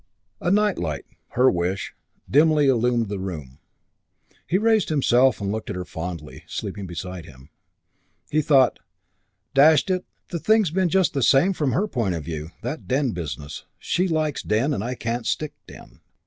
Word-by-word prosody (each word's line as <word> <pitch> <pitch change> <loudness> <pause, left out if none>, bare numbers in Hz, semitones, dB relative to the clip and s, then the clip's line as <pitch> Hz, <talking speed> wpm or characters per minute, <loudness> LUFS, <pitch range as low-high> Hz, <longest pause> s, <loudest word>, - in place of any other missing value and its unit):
A - - -1
night 210 +1 +2
light, 75 -5 -3 0.3
her 125 +2 +4
wish, 90 +2 -2 0.3
dimly 150 +1 +4
illumined 120 -2 +2
the 100 -1 -4
room. 75 -9 -6 0.9
He 180 - +2
raised 220 0 +2
himself 130 -3 +3
and 100 -1 -2
looked 110 0 -4
at - - -3
her 90 0 -4
fondly, 80 -1 -7
sleeping 100 -2 -5
beside 90 0 -6
him. 65 -1 -15 0.8
He 155 - +3
thought, 135 -4 +4 0.7
"Dash 150 +5 +6
it, 185 0 0 0.3
the 170 - -3
thing's 215 -2 +3
been 185 0 +1
just 185 -2 +2
the 140 - -1
same 140 +10 +4
from 145 -8 -1
her 205 - +1
point 115 - -1
of 80 - -5
view. 80 -1 -5
That 155 - -5
den 130 -1 +1
business. 75 - -6
She 180 +3 0
likes 155 -4 -1
den, 120 +8 +1
and 105 - -2
I 125 +2 -3
can't 120 0 -3
stick 155 -1 -2
den. - - -14
125 Hz, 170 wpm, -23 LUFS, -, 0.9 s, Dash